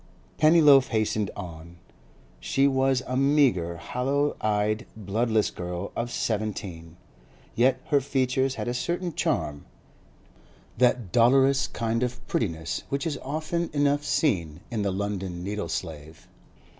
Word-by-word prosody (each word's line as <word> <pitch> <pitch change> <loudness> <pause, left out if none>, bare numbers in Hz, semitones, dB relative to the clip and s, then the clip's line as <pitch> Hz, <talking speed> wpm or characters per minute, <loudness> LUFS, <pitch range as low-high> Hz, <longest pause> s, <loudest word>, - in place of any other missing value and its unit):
Pennyloaf 150 -4 +6
hastened 110 -2 0
on. 85 -3 -9 0.6
She 135 +1 +2
was 135 -1 +2
a 130 - -3
meagre, 130 - +2
hollow 135 - -1
eyed, 105 +2 0
bloodless 110 +2 0
girl 90 +2 -5
of 120 +1 -2
seventeen, 100 -8 -3 0.6
yet 130 +3 +3
her 145 -1 +3
features 130 0 0
had - - -4
a 120 - -1
certain 175 +6 -2
charm—that 115 - -3
dolorous 135 +4 +4
kind 115 0 -2
of 125 0 -3
prettiness 80 -7 -2
which 140 0 -2
is 150 -4 -2
often 160 +4 -2
enough 145 0 +2
seen 85 - 0
in 110 -3 -1
the 100 - 0
London 95 -3 -3
needle 105 +2 -4
slave. 80 -2 -6
120 Hz, 120 wpm, -26 LUFS, 95-135 Hz, 0.6 s, Pennyloaf